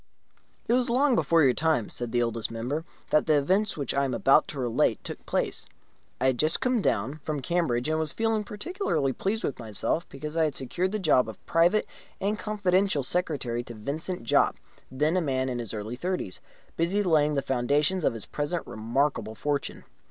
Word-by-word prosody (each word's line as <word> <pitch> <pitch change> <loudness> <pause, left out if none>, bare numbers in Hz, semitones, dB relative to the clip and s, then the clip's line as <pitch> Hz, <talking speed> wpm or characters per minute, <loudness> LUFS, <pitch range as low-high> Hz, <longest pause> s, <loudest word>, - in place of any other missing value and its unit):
It - - +2
was 250 -1 +2
long 265 +3 +3
before 165 -8 +3
your 130 -3 +5
time 155 -6 +1
(said 120 -2 -2
the 120 0 +2
Oldest 115 -1 -2
Member) 125 +8 -3 0.3
that 155 - +3
the 155 -2 +5
events 190 +8 +1
which 140 -4 -2
I 140 - +2
am 130 -3 -1
about 135 +4 +4
to 145 - -4
relate 120 -3 +1
took - - -7
place. - - -1 0.5
I 130 - 0
had 130 -2 +2
just 155 +1 +3
come 250 -3 +1
down 135 - 0
from 150 0 -3
Cambridge, 130 -4 0
and 155 0 +1
was 155 -2 0
feeling 225 -1 0
particularly 210 - -2
pleased 210 - -2
with 135 - -2
myself 115 - -1
because 150 +3 -7
I 165 -1 +3
had 150 - -2
secured 175 +8 -1
the 215 - -1
job 150 - +3
of 110 - -11
private 175 +6 +3 0.3
and 210 +2 -1
confidential 195 -6 +1
secretary 135 -7 -1
to 120 -1 -9
Vincent 155 - -4
Jopp, 115 - +3 0.3
then 150 +6 +1
a 185 - +2
man 130 -4 0
in 125 -1 -3
the 115 -4 -4
early 110 +3 -5
thirties, 175 - -3 0.4
busy 175 +5 +1
in - - -2
laying 150 -3 +3
the 140 - 0
foundations 145 +8 +1
of 115 - +2
his 110 - -3
present 150 +4 -3
remarkable 115 0 -1
fortune. 145 +1 -2
150 Hz, 195 wpm, -27 LUFS, 125-180 Hz, 0.5 s, your